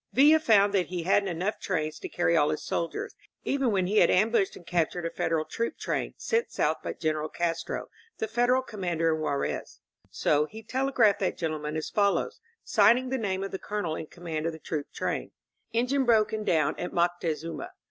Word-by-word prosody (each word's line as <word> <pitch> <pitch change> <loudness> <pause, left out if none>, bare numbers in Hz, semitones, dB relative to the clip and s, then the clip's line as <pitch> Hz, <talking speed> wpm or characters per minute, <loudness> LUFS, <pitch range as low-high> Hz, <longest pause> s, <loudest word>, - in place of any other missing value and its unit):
Villa 300 +4 +6
found 205 -8 +4
that 185 -4 +2
he 180 -2 -4
hadn't 195 +2 +2
enough 180 +5 -2
trains 155 -5 -2
to - - -6
carry 170 -1 +1
all 150 -2 +4
his 155 - -2
soldiers, 170 - -3 0.3
even 270 -2 +1
when 190 -3 +1
he 205 +4 0
had - - +6
ambushed 210 +1 +2
and 175 - -13
captured 175 0 0
a 165 - -2
Federal 160 -1 0
troop 230 +6 -3
train, - - -2
sent 465 0 0
south - - +1
by - - -3
General 155 -1 -2
Castro, 170 -1 -2 0.3
the 220 - -2
Federal 245 +3 +2
commander 175 -8 -1
in 155 - -3
Juarez. 140 -2 -2 0.3
So 150 0 +1
he 220 +5 -10
tele 265 +5 -1
graphed 215 -6 +4
that 190 - -1
gentleman 155 -2 -3
as 155 - -4
follows, 200 - +1 0.2
signing 255 +2 +4
the 265 0 -1
name 195 -3 -1
of 195 - -4
the 190 - -4
Colonel 205 -7 -3
in 155 - -6
command 165 -2 -4
of 165 - -2
the - - -8
troop 150 -2 -4
train: - - -3 0.4
^En 235 +2 +1
gine 275 +1 +2
broken 220 -3 +2
down 155 -7 +1
at 175 - -3
Moctezuma. 170 - -1
185 Hz, 200 wpm, -28 LUFS, 165-220 Hz, 0.4 s, Villa